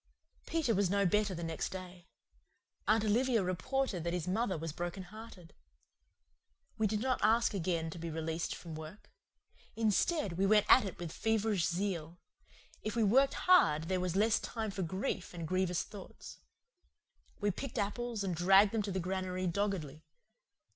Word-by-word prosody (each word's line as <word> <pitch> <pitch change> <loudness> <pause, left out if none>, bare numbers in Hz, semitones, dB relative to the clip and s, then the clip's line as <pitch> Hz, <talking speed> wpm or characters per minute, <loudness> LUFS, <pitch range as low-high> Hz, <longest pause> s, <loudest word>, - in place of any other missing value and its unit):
Peter 315 -8 +1
was 200 -2 +2
no 200 +1 +2
better 205 +1 +2
the 170 - -5
next 165 -1 -3
day. 185 -1 -9 0.8
Aunt 215 0 +4
Olivia 230 0 +2
reported 190 +2 -1
that 170 0 -2
his 180 -2 -2
mother 190 0 0
was 160 -1 -5
broken 175 +3 -4
hearted. 185 -3 -12 1.2
We 220 -1 +1
did 210 +1 -1
not 255 0 0
again 210 - +4 0.6
ask 160 - -5
to 170 - -8
be 165 0 -4
released 160 +1 -3
from 165 -2 -9
work. 155 +6 -10 0.6
Instead, 220 - +1
we 195 - +3
went 210 0 +5
at 255 - +7
it 195 - -6
with 170 -2 -6
feverish 220 -4 +1
zeal. 170 -2 -3 0.6
If 215 +1 -4
we 230 - +2
worked 265 +7 +4
hard 260 - +5
there 185 -1 +1
was 180 -1 -2
less 215 +3 +3
time 220 -3 -4
for 195 - -4
grief 185 +1 -3
and 165 -2 -5
grievious 185 0 0
thoughts. 200 -2 -11 1.0
We 205 -1 +1
picked 265 +7 -6
apples 225 +1 -2
and 190 -2 -1
dragged 195 +4 +5
them 225 - 0
to 200 -1 -3
the 190 - -1
granary 185 0 -2
doggedly. 170 -5 -2
190 Hz, 165 wpm, -33 LUFS, 175-215 Hz, 1.2 s, at